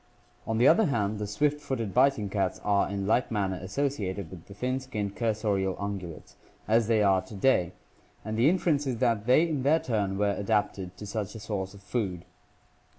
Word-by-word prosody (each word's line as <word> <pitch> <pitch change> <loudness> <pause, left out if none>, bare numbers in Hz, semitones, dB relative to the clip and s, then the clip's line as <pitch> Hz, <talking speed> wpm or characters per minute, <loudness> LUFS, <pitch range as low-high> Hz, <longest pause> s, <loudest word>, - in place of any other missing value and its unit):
On 110 - 0
the 120 +4 +5
other 190 +9 +6
hand, 105 -6 -1
the 105 - -3
swift 150 +8 0
footed 115 -8 -3
biting 130 -5 +3
cats 95 -1 -1
are 100 -2 +2
in 100 -1 -3
like 115 +5 +2
manner 95 -4 -1
associated 100 - -3
with 90 -3 -11
the 100 - -11
thin 130 +4 -1
skinned 105 -6 -4
cursorial 105 -5 0
ungulates—as 100 +3 -3
they 110 -2 +3
are 95 -2 +4
to 105 - -11
day— 95 -5 +2 0.5
and 110 0 -3
the 120 +6 +4
inference 165 -5 +1
is 125 -3 -1
that 115 -3 +1
they 155 +7 +5
in 150 -5 -2
their 145 +5 +4
turn 100 -7 -1
were 100 0 +2
adapted 100 -3 -1
to 105 - -8
such 105 0 -4
a - - -6
source 100 -2 -4
of 100 - -15
food. 95 -7 -3
105 Hz, 190 wpm, -28 LUFS, 100-125 Hz, 0.5 s, other